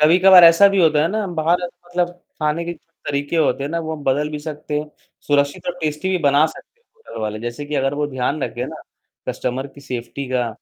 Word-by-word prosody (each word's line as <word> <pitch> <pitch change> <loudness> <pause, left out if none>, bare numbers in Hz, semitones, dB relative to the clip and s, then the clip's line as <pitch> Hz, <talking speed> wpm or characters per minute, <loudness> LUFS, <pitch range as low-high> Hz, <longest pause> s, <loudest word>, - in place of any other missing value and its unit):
कभी-कभार 180 +3 +8
ऐसा 165 +4 +8
भी 195 0 0
होता 155 -2 +4
है 165 - +2
ना 215 -1 -1
बाहर 170 0 +1
मतलब 175 0 -3 0.3
खाने 155 +3 0
के 170 - -3
तरीके 145 -2 -5
होते 150 -3 +2
हैं 145 - -4
ना, 170 - -1
वो 160 -1 -4
हम 150 - -9
बदल 145 +3 +1
भी 150 - -4
सकते 150 -1 -4
हैं। 150 0 -6 0.4
सुरक्षित 145 -1 +1
और 175 0 -2
टेस्टी 150 +3 -2
भी 185 - +1
बना 145 +1 +5
सकते 465 - -13
हैं 475 - -41
होटल 455 - -10
वाले। 110 0 -3
जैसे 120 +4 -5
कि 150 - -4
अगर 135 +1 +1
वो 145 0 -1
ध्यान 135 +2 -2
रखें - - -3
ना, - - -9 0.5
कस्टमर 130 +2 -2
की 140 0 -15
सेफ्टी 130 +1 -5
का 125 -2 0
150 Hz, 225 wpm, -20 LUFS, 140-170 Hz, 0.5 s, कभी-कभार